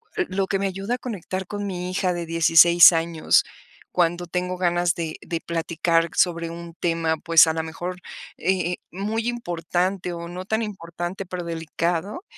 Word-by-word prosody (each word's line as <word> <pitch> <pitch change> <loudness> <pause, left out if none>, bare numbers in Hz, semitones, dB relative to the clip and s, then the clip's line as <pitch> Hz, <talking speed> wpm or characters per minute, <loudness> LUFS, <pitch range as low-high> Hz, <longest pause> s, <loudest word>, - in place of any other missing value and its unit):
l - - 0
lo 190 +1 -1
que 195 - 0
me 195 - 0
ayuda 195 +5 -3
a - - -6
conectar 190 -6 -5
con 205 +2 -5
mi 180 -1 -4
hija 185 -1 0
de 175 -1 -4
16 165 +1 +7
años, 165 -1 +2 0.5
cuando 175 0 +1
tengo 180 +1 -2
ganas 175 -1 +1
de 160 -2 -4
de 165 -2 -4
platicar 165 0 0
sobre 170 -2 +1
un 170 0 -8
tema, 165 -2 0
pues, 165 +1 +6
a - - +2
la 160 - -1
mejor, 175 +3 -6 0.4
eh 185 +1 0
eh, - - -5
muy 215 +5 -2
importante, 180 -4 -2
o 170 0 -7
no 180 +1 -7
tan 220 +2 0
importante, 180 -2 -5
pero 180 -1 -5
delicado, 170 - -3
175 Hz, 175 wpm, -23 LUFS, 165-190 Hz, 0.5 s, 16